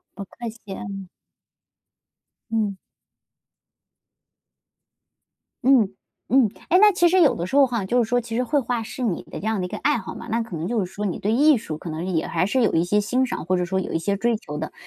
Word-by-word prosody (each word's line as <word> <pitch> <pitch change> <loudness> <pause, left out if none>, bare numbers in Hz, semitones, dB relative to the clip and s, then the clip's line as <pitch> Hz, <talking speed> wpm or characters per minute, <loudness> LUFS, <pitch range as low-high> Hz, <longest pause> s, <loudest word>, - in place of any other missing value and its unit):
不 200 - -6
客 235 +4 -7
气。 215 -3 -10
嗯。 195 -2 -7 1.4
嗯。 215 -3 0 2.9
嗯 245 -7 +4 0.4
嗯。 260 -4 +5 0.2
哎， 360 - +5
那 420 0 +7
其 350 -2 +4
实 370 +2 +4
有 310 - +5
的 170 - -3
时 185 - -6
候 280 -1 +7
哈， 235 -5 -2
就 245 +6 +2
是 220 - -3
说 245 +1 +2
其 225 -1 -7
实 250 - +1
绘 290 +3 +1
画 245 -2 -2
是 220 +3 -7
你 210 -8 -1
的 - - -8
这 - - -6
样 220 -1 0
的 - - -2
一 - - -8
个 - - -5
爱 295 -1 +2
好 - - -7
嘛， - - -9
那 230 +1 +1
可 225 -6 -7
能 160 +2 -3
就 225 -4 0
是 - - -5
说 210 - -4
你 195 - -2
对 210 - -1
艺 290 +5 +5
术 160 -8 -6
可 165 +2 -7
能 160 +3 -4
是 190 - -2
也 160 -1 0
还 170 +2 0
是 255 +5 +1
有 225 - +2
一 165 - +3
些 205 +4 +2
欣 250 +5 +1
赏， 245 - -4
或 185 +2 +1
者 180 - 0
说 190 +2 -1
有 - - -5
一 - - +1
些 200 +4 -1
追 235 +3 +1
求 150 -8 -8
的。 155 - -5
220 Hz, 260 characters per minute, -23 LUFS, 190-245 Hz, 2.9 s, 那